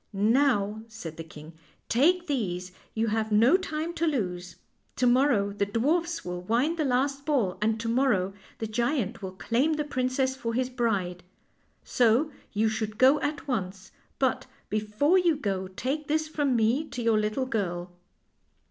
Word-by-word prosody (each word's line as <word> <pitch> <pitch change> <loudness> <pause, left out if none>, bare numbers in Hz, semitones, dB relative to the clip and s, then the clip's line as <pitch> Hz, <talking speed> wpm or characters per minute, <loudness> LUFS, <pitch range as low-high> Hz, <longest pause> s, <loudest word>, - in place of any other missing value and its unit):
" - - -46 0.3
Now," 215 -6 +1
said 195 -8 -8
the 165 - -5
king, 155 0 -12 0.2
" - - -40
take 350 +6 +4
these; 185 - -2 0.2
you 225 0 +1
have 220 0 -1
no 230 +9 +5
time 335 -3 -2
to 335 -1 0
lose. 180 - -2 0.4
To 250 - +1
niorrow 240 -6 +3
the 200 -1 0
dwarfs 320 +11 0
will 180 0 -4
wind 245 - +1
the - - +2
last 275 +2 0
ball, 255 -12 0
and 220 +1 +1
to 230 - -4
morrow 230 -6 +2 0.2
the 225 - -3
giant 235 0 -1
will 190 -1 -6
claim 245 +10 +1
the 300 0 -1
princess 260 -1 0
for 230 -3 -3
his 255 +1 0
bride. 200 -8 -1 0.6
So 245 +6 +2 0.2
you 220 +1 +1
should 215 -1 -3
go 270 +3 +6
at 295 0 -3
once; 190 -6 -3 0.3
but 260 -1 0 0.2
before 215 - +2
you 345 -3 +3
go 195 -8 -2
take 265 +11 -3
this 310 0 0
from 290 -4 0
me 235 +6 +2
to 245 - -5
your 225 -2 +3
little 215 +5 -1
girl." 180 -7 -3
235 Hz, 170 wpm, -27 LUFS, 205-280 Hz, 0.6 s, go